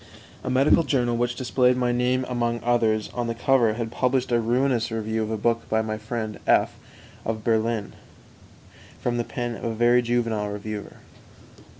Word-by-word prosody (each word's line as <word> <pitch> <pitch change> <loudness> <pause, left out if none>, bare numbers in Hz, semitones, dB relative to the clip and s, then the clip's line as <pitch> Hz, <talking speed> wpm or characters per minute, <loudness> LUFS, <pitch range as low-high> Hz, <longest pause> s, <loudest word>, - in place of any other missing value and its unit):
2. - - -8
A - - 0
medical 135 +5 +4
journal 125 -5 +1
which 120 +1 0
displayed 125 0 +2
my 125 -1 +1
name 125 +1 +1
among 120 -1 -1
others 115 -3 +1
on 120 -1 -2
the 115 - -2
cover 120 -2 +3
had 115 0 -4
published 130 +1 0
a 120 - +3
ruinous 120 0 +1
review 110 0 -2
of 110 - -2
a 110 - -2
book 115 +2 0
by 110 0 +1
my 110 0 -3
friend 110 0 -5
F - - +3 0.5
of 110 -1 -3
Berlin, 110 -1 0 1.1
from 120 0 -1
the 120 - 0
pen 120 0 -4
of - - -10
a 115 -2 -2
very 120 +2 +4
juvenile 115 -3 -1
reviewer. 105 0 -6
120 Hz, 180 wpm, -24 LUFS, 110-125 Hz, 1.1 s, medical